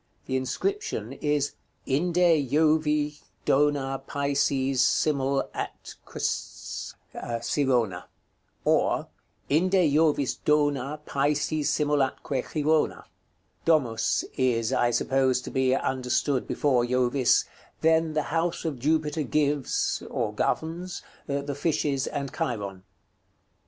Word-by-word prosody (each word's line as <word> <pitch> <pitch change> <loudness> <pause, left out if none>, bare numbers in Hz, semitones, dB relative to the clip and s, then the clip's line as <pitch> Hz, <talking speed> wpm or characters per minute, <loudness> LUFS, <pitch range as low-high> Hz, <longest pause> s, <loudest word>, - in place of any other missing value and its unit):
The 130 - -2
inscription 395 - -2
is: 145 -1 0 0.3
"INDE 165 -1 +2
JOVI' 150 0 +2 0.3
DONA 135 -2 +2
PISES 140 -2 +1
SIMUL 135 +1 +2
ATQ^s - - -5 0.5
CIRONA." 120 -12 0 0.6
Or, - - +2 0.4
"Inde 175 +6 +2 0.2
Jovis 150 -3 +2
dona 145 -1 +1
Pisces 145 +2 0
simul 150 -1 +1
atque 135 -1 -1
Chirona." 155 0 +1 0.6
Domus 130 -9 +2
is, 125 -2 +1
I 120 -2 +3
suppose, 130 +2 +2
to - - -8
be 130 -1 +2
understood 130 +1 0
before 130 -5 +2
Jovis: 125 +1 +2 0.4
"Then 160 0 +3
the 155 -1 +1
house 165 +1 0
of 150 -6 -2
Jupiter 155 +2 +1
gives 145 -1 0
(or - - -2
governs?) 170 +3 -2 0.2
the 140 0 -2
fishes 145 -2 0
and 140 -2 -4
Chiron." 100 -5 -3
145 Hz, 100 wpm, -27 LUFS, 130-155 Hz, 0.6 s, I